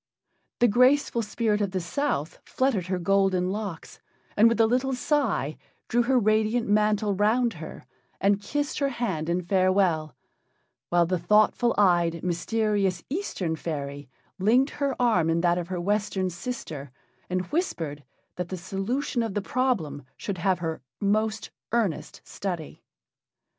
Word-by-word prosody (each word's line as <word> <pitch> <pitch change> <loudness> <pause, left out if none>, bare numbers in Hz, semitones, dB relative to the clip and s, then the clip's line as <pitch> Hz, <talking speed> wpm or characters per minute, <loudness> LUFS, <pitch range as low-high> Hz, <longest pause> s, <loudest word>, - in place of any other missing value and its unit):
The 240 - +4
graceful 250 +2 +3
spirit 215 -1 0
of 200 -2 -1
the 185 - 0
South 170 - -2
fluttered 245 -9 0
her 185 0 -1
golden 190 0 +2
locks, 200 -5 -6 0.4
and 225 +2 +6
with 230 - -1
a 225 - +6
little 255 +4 +1
sigh 250 - 0 0.3
drew 240 - +3
her 255 +2 +2
radiant 220 +1 +2
mantle 210 0 +2
round 225 +4 +2
her, 160 - -8 0.4
and 200 +2 +2
kissed 290 +9 -2
her 280 -1 +1
hand 190 - -2
in 180 +1 0
farewell, 185 -4 +2 0.7
while 175 -1 +4
the 180 +1 -1
thoughtful 215 +6 +3
eyed, 175 -4 +3
mysterious 195 0 0
Eastern 205 - -2
fairy 145 -4 -5 0.3
linked 245 +8 +3
her 280 -3 -2
arm 220 -10 +3
in 165 +1 +2
that 175 0 +2
of 170 - -5
her 185 -1 -3
Western 195 0 0
sister, 170 - -6 0.4
and 185 0 -1
whispered 165 - -2 0.3
that 180 -1 -3
the 185 - -4
solution 200 - -2
of 225 -4 -3
the - - +2
problem 200 - -1
should 195 -4 -4
have 185 +1 +2
her 165 -4 -4 0.2
most 215 +2 0 0.2
earnest 215 -9 -1
study. 175 -6 -5
200 Hz, 145 wpm, -26 LUFS, 175-230 Hz, 0.7 s, and